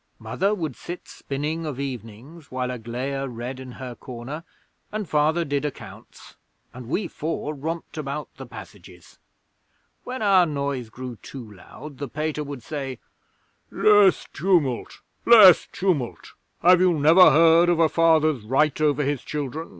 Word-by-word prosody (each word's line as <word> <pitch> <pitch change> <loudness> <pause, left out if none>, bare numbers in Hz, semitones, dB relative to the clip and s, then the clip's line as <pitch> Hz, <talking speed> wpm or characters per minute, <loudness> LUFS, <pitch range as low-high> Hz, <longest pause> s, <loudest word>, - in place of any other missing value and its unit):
Mother 200 +2 -1
would 160 - -4
sit 175 +1 -8
spinning 150 +4 -4
of 145 -4 -5
evenings 135 +4 -8
while 125 0 -2
Aglaia 125 +4 -4
read 125 +1 -6
in 130 -1 -9
her 130 -1 -8
corner, 125 +7 -8 0.5
and 215 -2 -4
Father 155 +3 +1
did 140 -1 -2
accounts, 150 - -9 0.4
and 125 -2 -10
we 190 +5 -1
four 155 -1 -4
romped 160 +2 -6
about 145 0 -4
the 135 -2 -9
passages. 100 -6 -13 0.8
When 255 -2 -5
our 190 -4 +5
noise 140 -5 -3
grew 125 +1 -8
too 115 -4 -10
loud 130 +9 -12
the 140 - -4
Pater 150 +2 -3
would 140 -4 -8
say, 135 -3 -5 0.7
"Less 205 -5 +4
tumult! 155 -8 0 0.2
Less 210 -7 +8
tumult! 170 -11 -2 0.3
Have 180 +1 +6
you 180 -3 +3
never 160 +5 +7
heard 165 +3 +5
of 175 - +2
a 165 - +5
Father's 155 -4 +2
right 135 +8 +1
over 150 -1 +2
his 140 -2 -1
children? 150 +2 -5
145 Hz, 145 wpm, -24 LUFS, 130-165 Hz, 0.8 s, Less